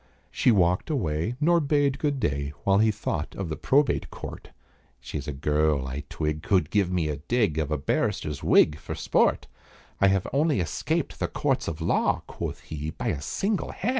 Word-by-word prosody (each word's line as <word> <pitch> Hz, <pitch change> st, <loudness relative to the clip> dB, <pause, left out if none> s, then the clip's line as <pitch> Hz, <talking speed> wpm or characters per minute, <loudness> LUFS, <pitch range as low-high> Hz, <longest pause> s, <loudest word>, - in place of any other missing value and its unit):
She -, -, +2 dB
walked 90 Hz, -, +3 dB
away, 85 Hz, -, -1 dB
nor 170 Hz, +3 st, +4 dB
bade 145 Hz, -2 st, +1 dB
good 145 Hz, -3 st, 0 dB
day, 70 Hz, -, -1 dB
While 100 Hz, 0 st, +4 dB
he 110 Hz, +1 st, +4 dB
thought 100 Hz, -7 st, -3 dB
of 95 Hz, -4 st, -4 dB
the 80 Hz, -, -2 dB
Probate 140 Hz, +1 st, +2 dB
Court. -, -, -8 dB, 0.5 s
"She's 70 Hz, +2 st, -6 dB
a -, -, -2 dB
girl, 75 Hz, 0 st, +1 dB
I 70 Hz, +3 st, -5 dB
twig, 75 Hz, 0 st, -2 dB
could 90 Hz, -5 st, +1 dB
give 100 Hz, -4 st, +2 dB
me 90 Hz, -4 st, 0 dB
a 75 Hz, -2 st, -2 dB
dig 95 Hz, -, 0 dB
Of 75 Hz, -2 st, -1 dB
a 75 Hz, -, 0 dB
barrister's 70 Hz, +1 st, -1 dB
wig 75 Hz, 0 st, +4 dB
for -, -, -6 dB
sport. -, -, +2 dB, 0.5 s
I 100 Hz, -, +5 dB
have 95 Hz, -1 st, +2 dB
only 145 Hz, -2 st, +2 dB
escaped 85 Hz, -, -2 dB
the -, -, 0 dB
courts -, -, -1 dB
of 80 Hz, 0 st, -4 dB
law," 80 Hz, -, +1 dB
Quoth -, -, -5 dB
he, 75 Hz, 0 st, -5 dB
"by -, -, -3 dB
a 70 Hz, -, -2 dB
single 200 Hz, -, -2 dB
hair!" 210 Hz, -, -2 dB
85 Hz, 190 wpm, -26 LUFS, 75-125 Hz, 0.5 s, I